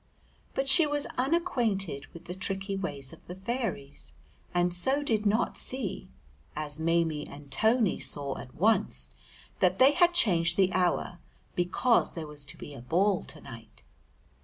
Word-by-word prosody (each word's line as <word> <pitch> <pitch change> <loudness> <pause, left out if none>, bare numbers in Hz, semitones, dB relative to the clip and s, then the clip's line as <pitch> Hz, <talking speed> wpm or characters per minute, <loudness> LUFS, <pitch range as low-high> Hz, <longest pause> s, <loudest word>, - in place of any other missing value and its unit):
But 270 - -1
she 300 +3 +7
was 290 -1 +1
unacquainted 240 - 0
with 170 +1 -14
the 180 - -6
tricky 195 +1 -3
ways 145 -8 -5
of - - -16
the 180 - -7
fairies, 190 - -5 0.4
and 175 0 +1
so 265 +11 +2
did 220 -6 0
not 220 +4 +1
see 255 -8 -4 0.5
(as 150 0 -5
Maimie 160 -2 0
and 140 -1 -12
Tony 220 - +2
saw 140 -2 +2
at 125 - -11
once) 210 +2 +1 0.5
that 185 0 +3
they 265 +5 +7
had 350 +2 +3
changed 170 - +3
the 190 -2 +3
hour 180 0 0 0.3
because 185 +7 +2
there 165 -2 -5
was 150 -1 -3
to 145 - -11
be 145 - -9
a 135 - -10
ball 180 +9 +1
to 155 - -10
night. 115 -1 -13
185 Hz, 160 wpm, -29 LUFS, 155-235 Hz, 0.5 s, she